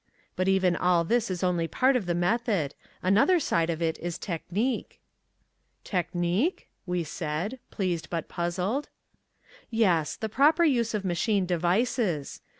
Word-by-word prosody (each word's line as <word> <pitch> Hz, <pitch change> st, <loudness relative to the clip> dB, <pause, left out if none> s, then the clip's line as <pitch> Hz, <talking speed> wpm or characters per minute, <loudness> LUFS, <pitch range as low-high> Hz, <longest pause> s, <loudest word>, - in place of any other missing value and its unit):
But 185 Hz, -, 0 dB
even 190 Hz, -2 st, +3 dB
all 180 Hz, -1 st, +3 dB
this 235 Hz, +5 st, +1 dB
is 185 Hz, 0 st, -3 dB
only 175 Hz, -2 st, +1 dB
part 260 Hz, +9 st, +2 dB
of 220 Hz, -8 st, -1 dB
the 175 Hz, -, +1 dB
method. 185 Hz, -, 0 dB, 0.3 s
Another 220 Hz, -, +4 dB
side 170 Hz, -, +1 dB
of 165 Hz, 0 st, -1 dB
it 160 Hz, -1 st, -1 dB
is 175 Hz, -1 st, -4 dB
technique." 195 Hz, +8 st, -3 dB, 0.8 s
"Technique?" 180 Hz, -, -1 dB, 0.2 s
we 180 Hz, -1 st, 0 dB
said, 165 Hz, -, -4 dB
pleased 180 Hz, -5 st, -2 dB
but 165 Hz, -2 st, -3 dB
puzzled. 180 Hz, +10 st, -2 dB, 0.8 s
"Yes, 185 Hz, -9 st, +2 dB
the 220 Hz, -, -3 dB
proper 290 Hz, -, +4 dB
use 240 Hz, -8 st, +2 dB
of 200 Hz, -2 st, -3 dB
machine 190 Hz, +3 st, +1 dB
devices. 180 Hz, -, 0 dB
185 Hz, 140 wpm, -27 LUFS, 170-225 Hz, 0.8 s, Another